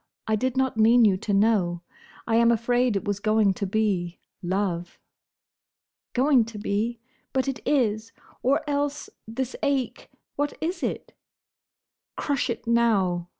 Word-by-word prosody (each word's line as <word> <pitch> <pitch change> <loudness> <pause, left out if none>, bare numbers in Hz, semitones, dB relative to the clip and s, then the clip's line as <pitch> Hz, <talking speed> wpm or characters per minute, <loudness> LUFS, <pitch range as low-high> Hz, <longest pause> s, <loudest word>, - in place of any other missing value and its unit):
I 220 - +1
did 255 +4 -1
not 260 -3 +1
mean 230 +2 +6
you 200 -3 +4
to 205 - -4
know. 195 -4 +2 0.4
I 225 -1 +2
am 235 0 +5
afraid 240 0 +1
it 195 - -2
was 205 -1 -1
going 215 -1 +3
to 200 +2 -3
be—love." 185 -2 -2 1.2
"Going 260 -1 +4
to 225 -1 -9
be! 215 +3 -2 0.3
But 265 0 0
it 270 -1 -2
is! 225 -5 +1 0.3
Or 275 +4 +1
else, 290 0 -2 0.2
this 255 +3 -4
ache? 280 -4 -1 0.3
What 290 +1 -1
is 345 +4 -3
it?" - - -4 1.0
"Crush 275 -3 -1
it 235 - -4
now!" 200 -7 +1
225 Hz, 140 wpm, -25 LUFS, 205-255 Hz, 1.2 s, mean